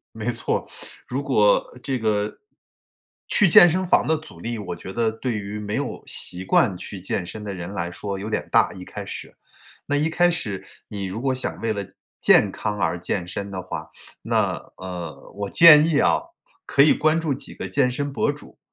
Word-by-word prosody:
没 110 +2 -2
错， 120 -1 -2 0.4
如 130 +3 -2
果 105 -7 +3
这 135 -2 -2
个 105 -2 -1 0.9
去 210 - +4
健 175 +1 +8
身 185 +3 -1
房 - - +3
的 160 - +2
阻 105 - -13
力 115 +4 -4
我 100 -4 -5
觉 95 - -9
得 115 +1 +1
对 115 +3 -4
于 100 +1 -6
没 105 0 -5
有 140 -1 -4
习 90 +1 0
惯 130 - +3
去 95 +2 -7
健 90 0 -3
身 105 +4 -8
的 100 -2 -5
人 90 +1 -6
来 85 -3 -3
说 100 +2 -5
有 100 +2 -5
点 110 - -3
大， - - +4
一 90 - -9
开 - - -8
始。 - - -8 0.5
那 145 - 0
一 155 +3 +1
开 175 +2 +3
始， 105 - -4 0.2
你 100 -2 -5
如 95 +4 -5
果 135 -1 +1
想 130 - -3
为 115 -1 0
了 100 -2 -4 0.4
健 100 - +5
康 105 +1 -3
而 85 -2 0
健 90 0 -3
身 100 +3 -5
的 95 -1 -5
话， 90 - -6 0.3
那， - - +1 0.2
呃， 85 -6 -8
我 100 -1 -4
建 160 -2 +9
议 160 -3 +2
啊， - - +3 0.5
可 140 - +4
以 150 - +6
关 155 +1 +2
注 160 -3 -1
几 130 - -8
个 - - -6
健 135 -3 +2
身 140 +3 -3
博 140 - +1
主。 145 - -13
110 Hz, 220 characters per minute, -23 LUFS, 95-140 Hz, 0.9 s, 建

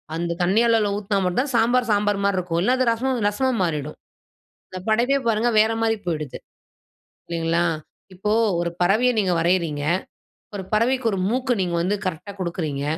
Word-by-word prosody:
அந்த 170 0 -2
தண்ணீ 195 +6 +3
அளவுல 225 -3 +3
ஊத்துனா 200 -1 -1
மட்டும் 180 +7 +1
தான் 280 -3 -6
சாம்பார், 245 +2 +3
சாம்பார் 205 0 +1
மாரி 200 -2 +1
இருக்கு. 170 -2 -2
இல்ல 250 - +3
அது 255 - +2
ரசம் 250 +1 -1
ரசமா 260 +6 0
மாறிடும். 150 -3 -3 0.7
இந்த 185 - -6
படைபே 245 +5 +2
பாருங்க 225 +2 +2
வேற 220 +1 +3
மாரி 225 0 +2
போய்டுது. 155 -5 -3 0.9
இல்லைங்களா? 170 0 0 0.5
இப்போ 210 +3 -2 0.3
ஒரு 170 - -1
பறவைய 215 +8 +3
நீங்க 190 -3 +1
வரையிறீங்க. 165 -4 0 0.7
ஒரு 190 - -4
பறவைக்கு 235 +3 +1
1 195 - -1
மூக்கு 255 +1 0
நீங்க 175 -2 -1
வந்து 195 +4 0
கரெக்ட்டா 185 +3 -4
குடுக்கிறீங்க. 155 -5 -3
200 Hz, 160 wpm, -22 LUFS, 170-230 Hz, 0.9 s, தண்ணீ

